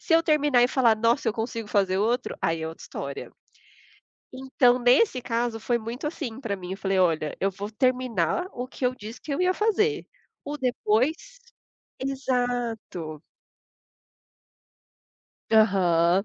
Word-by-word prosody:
se 330 Hz, -, -2 dB
eu 330 Hz, -, +5 dB
terminar, 295 Hz, -6 st, +3 dB
e 245 Hz, -, +4 dB
falar: 235 Hz, -5 st, +3 dB
"Nossa, 230 Hz, +1 st, +2 dB
eu -, -, +1 dB
consigo 225 Hz, -1 st, -4 dB
fazer 190 Hz, -2 st, +1 dB
outro", 235 Hz, +4 st, 0 dB
aí 165 Hz, -1 st, 0 dB
é 160 Hz, -, -3 dB
outra 160 Hz, -, -10 dB
história. -, -, -7 dB, 1.0 s
Então, 255 Hz, -1 st, +2 dB
nesse 255 Hz, -, +3 dB
caso, 230 Hz, -1 st, -2 dB
foi 240 Hz, +1 st, 0 dB
muito 235 Hz, +6 st, -6 dB
assim 265 Hz, -6 st, -5 dB
pra 205 Hz, -6 st, -3 dB
mim, 180 Hz, 0 st, -7 dB
eu -, -, -4 dB
falei: 195 Hz, -1 st, -1 dB
"Olha, 160 Hz, -4 st, +1 dB
eu 195 Hz, -, +2 dB
vou 205 Hz, +2 st, -7 dB
terminar 255 Hz, -, 0 dB
o 245 Hz, +1 st, -5 dB
que 260 Hz, -, -7 dB
eu 250 Hz, -, +2 dB
disse 220 Hz, 0 st, -10 dB
que 290 Hz, -, -5 dB
eu 280 Hz, -, -1 dB
ia 365 Hz, 0 st, +2 dB
fazer, 430 Hz, 0 st, +1 dB, 0.4 s
o 290 Hz, +1 st, -4 dB
depois" 250 Hz, +2 st, +1 dB, 0.8 s
exato. 245 Hz, -, -2 dB, 2.3 s
Aham. 190 Hz, -4 st, +4 dB
235 Hz, 150 wpm, -26 LUFS, 200-260 Hz, 2.3 s, eu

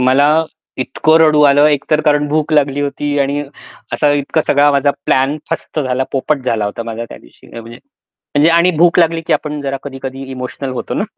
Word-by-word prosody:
मला 145 Hz, +5 st, +3 dB, 0.3 s
इतकं 155 Hz, +5 st, +1 dB
रडू 155 Hz, -2 st, +4 dB
आलं 145 Hz, +1 st, +5 dB
एक 145 Hz, -2 st, 0 dB
तर 155 Hz, 0 st, +3 dB
कारण 150 Hz, -1 st, +2 dB
भूक 155 Hz, +1 st, -1 dB
लागली 145 Hz, -2 st, +2 dB
होती 145 Hz, 0 st, -2 dB
आणि 140 Hz, +1 st, -1 dB, 0.5 s
असा 145 Hz, -1 st, +2 dB
इतका 145 Hz, +2 st, 0 dB
सगळा 145 Hz, +1 st, +4 dB
माझा 140 Hz, 0 st, +2 dB, 0.2 s
प्लॅन 135 Hz, +3 st, +1 dB
फस्त -, -, -4 dB
झाला 130 Hz, -1 st, -1 dB
पोपट 140 Hz, +1 st, -1 dB
झाला 110 Hz, -2 st, 0 dB
होता 105 Hz, +3 st, -4 dB
माझा 115 Hz, 0 st, -6 dB
त्यादिवशी -, -, -15 dB
म्हणजे 115 Hz, +1 st, -12 dB, 0.6 s
म्हणजे 150 Hz, +3 st, +5 dB
आणि 170 Hz, +2 st, +4 dB
भूक 170 Hz, 0 st, +4 dB
लागली 165 Hz, -1 st, +2 dB
की -, -, +1 dB
आपण 150 Hz, -1 st, -2 dB
जरा 135 Hz, -1 st, -3 dB
कधी-कधी 135 Hz, -1 st, -7 dB
इमोशनल 130 Hz, +1 st, -6 dB
होतो 125 Hz, -, -5 dB
ना. -, -, -1 dB
145 Hz, 190 wpm, -15 LUFS, 130-150 Hz, 0.6 s, आलं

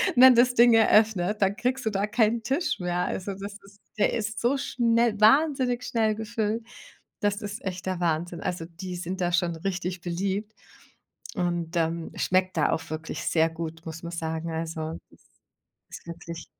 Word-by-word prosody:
wenn 255 Hz, 0 st, +9 dB
das 245 Hz, +1 st, +5 dB
Ding 240 Hz, 0 st, +6 dB
eröffnet, 215 Hz, -3 st, +4 dB
dann 195 Hz, 0 st, +3 dB
kriegst 250 Hz, +3 st, -1 dB
du -, -, +2 dB
da 200 Hz, -1 st, 0 dB
keinen 225 Hz, +1 st, +2 dB
Tisch 270 Hz, +8 st, -1 dB
mehr. 175 Hz, -1 st, -1 dB
Also, 195 Hz, +2 st, -3 dB
das 200 Hz, +1 st, -7 dB
ist 200 Hz, 0 st, -19 dB, 0.2 s
der 210 Hz, -, +2 dB
ist 220 Hz, -1 st, -2 dB
so 250 Hz, +4 st, +2 dB
schnell 235 Hz, -4 st, +1 dB
wahnsinnig 255 Hz, +1 st, +4 dB
schnell 220 Hz, -2 st, +1 dB
gefüllt, 220 Hz, 0 st, -2 dB, 0.6 s
das 205 Hz, +1 st, 0 dB
ist 205 Hz, 0 st, -6 dB
echt 185 Hz, -1 st, -5 dB
der 185 Hz, -2 st, -2 dB
Wahnsinn. 170 Hz, 0 st, -1 dB
Also, 175 Hz, -2 st, -3 dB
die 180 Hz, +2 st, -7 dB
sind 180 Hz, +2 st, -4 dB
da 175 Hz, 0 st, +1 dB
schon 175 Hz, -1 st, +1 dB
richtig 180 Hz, 0 st, -3 dB
beliebt 195 Hz, +4 st, -2 dB, 0.8 s
und, 175 Hz, -3 st, -2 dB
ähm, 165 Hz, 0 st, -1 dB
schmeckt 185 Hz, -1 st, +1 dB
da 150 Hz, -, +3 dB
auch 160 Hz, -, -3 dB
wirklich 160 Hz, +1 st, -5 dB
sehr 160 Hz, 0 st, +3 dB
gut, 165 Hz, 0 st, -7 dB
muss 160 Hz, 0 st, -7 dB
man 170 Hz, -, -5 dB
sagen. 160 Hz, -1 st, -3 dB
Also, 160 Hz, 0 st, -4 dB
das -, -, -22 dB, 0.7 s
ist -, -, -10 dB
wirklich 170 Hz, 0 st, -8 dB
190 Hz, 175 wpm, -26 LUFS, 170-220 Hz, 0.8 s, wenn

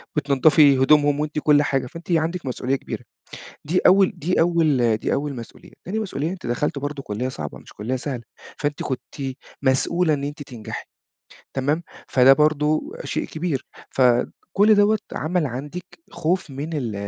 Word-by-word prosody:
بتنضّفي 145 Hz, 0 st, +5 dB
هدومهم، 145 Hz, +2 st, +4 dB
وأنتِ 150 Hz, 0 st, -1 dB
كُلّ 150 Hz, -1 st, +4 dB
حاجة، 135 Hz, -2 st, 0 dB
فأنتِ 165 Hz, +7 st, -9 dB
عندِك 170 Hz, +1 st, 0 dB
مسؤوليّة 130 Hz, +1 st, -1 dB
كبيرة. -, -, -6 dB, 0.6 s
دي 170 Hz, +5 st, +1 dB
أوّل 195 Hz, 0 st, +6 dB
دي 180 Hz, +5 st, 0 dB
أوّل 155 Hz, -9 st, +3 dB
دي -, -, -2 dB
أوّل 145 Hz, -1 st, -2 dB
مسؤوليّة. 115 Hz, -1 st, -11 dB
تاني 200 Hz, +5 st, -3 dB
مسؤوليّة، 165 Hz, -8 st, -2 dB
أنتِ 185 Hz, -6 st, -7 dB
دخلتِ 140 Hz, +5 st, -1 dB
برضو 145 Hz, 0 st, -4 dB
كلية 115 Hz, +2 st, -3 dB
صعبة، 75 Hz, -, -6 dB
مش -, -, -15 dB
كلية 115 Hz, +6 st, -3 dB
سهلة، 130 Hz, -2 st, -4 dB, 0.4 s
فأنتِ 145 Hz, 0 st, -2 dB
كنتِ 130 Hz, -3 st, -5 dB, 0.5 s
مسؤولة 155 Hz, +5 st, +2 dB
إن 140 Hz, -1 st, -3 dB
أنتِ 145 Hz, +1 st, -5 dB
تنجحي. 120 Hz, -6 st, -7 dB, 0.7 s
تمام، 145 Hz, +5 st, 0 dB, 0.2 s
فده 130 Hz, +1 st, +6 dB
برضو 155 Hz, -, +1 dB
شيء -, -, -2 dB
كبير. 155 Hz, -4 st, -3 dB, 0.3 s
فكُلّ 135 Hz, -, +3 dB
دَوّة 205 Hz, +1 st, +4 dB
عمل 165 Hz, +1 st, 0 dB
عندِك 145 Hz, +8 st, -6 dB, 0.3 s
خوف 180 Hz, +1 st, -1 dB
من 140 Hz, +3 st, -5 dB
ال 125 Hz, -8 st, -2 dB
145 Hz, 155 wpm, -23 LUFS, 130-165 Hz, 0.7 s, أوّل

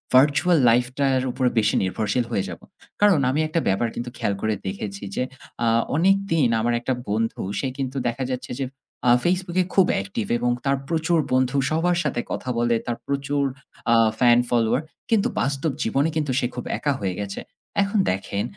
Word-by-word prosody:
virtual 150 Hz, +6 st, +5 dB
life 125 Hz, +1 st, +3 dB
টার 135 Hz, -2 st, +3 dB
উপর 130 Hz, -, -1 dB
বেশি 105 Hz, -, +2 dB
নির্ভরশীল 110 Hz, +5 st, 0 dB
হয়ে 100 Hz, -, 0 dB
যাব। -, -, -7 dB, 0.4 s
কারণ 200 Hz, -7 st, +5 dB
আমি 145 Hz, +4 st, 0 dB
একটা 160 Hz, +2 st, 0 dB
ব্যাপার 100 Hz, +5 st, +2 dB
কিন্তু 120 Hz, +1 st, -4 dB
খেয়াল 100 Hz, -, 0 dB
করে 110 Hz, 0 st, +1 dB
দেখেছি 100 Hz, +1 st, -5 dB
যে -, -, 0 dB, 0.4 s
আ -, -, +3 dB, 0.3 s
অনেকদিন 180 Hz, -5 st, +3 dB
আমার 120 Hz, +2 st, +1 dB
একটা 130 Hz, -, -1 dB, 0.2 s
বন্ধু 115 Hz, +2 st, -1 dB, 0.2 s
সে 135 Hz, -, -1 dB
কিন্তু 135 Hz, 0 st, -3 dB
দেখা 120 Hz, +3 st, -2 dB
যাচ্ছে 125 Hz, -, -4 dB, 0.6 s
আ -, -, +6 dB
Facebook 180 Hz, 0 st, 0 dB
এ -, -, +2 dB
খুব 190 Hz, -2 st, +5 dB
অ্যাক্টিভ 100 Hz, +2 st, -3 dB
এবং 120 Hz, 0 st, +1 dB
তার 135 Hz, 0 st, +2 dB
প্রচুর 165 Hz, 0 st, +1 dB
বন্ধু, 130 Hz, +1 st, +2 dB
সবার 170 Hz, +2 st, +2 dB
সাথে 130 Hz, -5 st, -1 dB
কথা 130 Hz, -, -4 dB
বলে, 120 Hz, 0 st, +2 dB
তার 120 Hz, -1 st, -1 dB
প্রচুর 140 Hz, 0 st, -1 dB, 0.5 s
আ -, -, +6 dB, 0.2 s
ফ্যান 120 Hz, -1 st, +6 dB
ফলোয়ার। 120 Hz, +3 st, +2 dB, 0.3 s
কিন্তু 220 Hz, -3 st, +3 dB
বাস্তব 140 Hz, +3 st, 0 dB
জীবনে 135 Hz, +7 st, +1 dB
কিন্তু 150 Hz, -4 st, 0 dB
সে 125 Hz, -, 0 dB
খুব 125 Hz, -, -4 dB
একা 145 Hz, -, 0 dB
হয়ে 95 Hz, -3 st, -2 dB
গেছে। 100 Hz, -1 st, -4 dB, 0.4 s
এখন 200 Hz, +2 st, 0 dB
দেখেন 100 Hz, +2 st, -2 dB
130 Hz, 180 wpm, -23 LUFS, 115-155 Hz, 0.6 s, আ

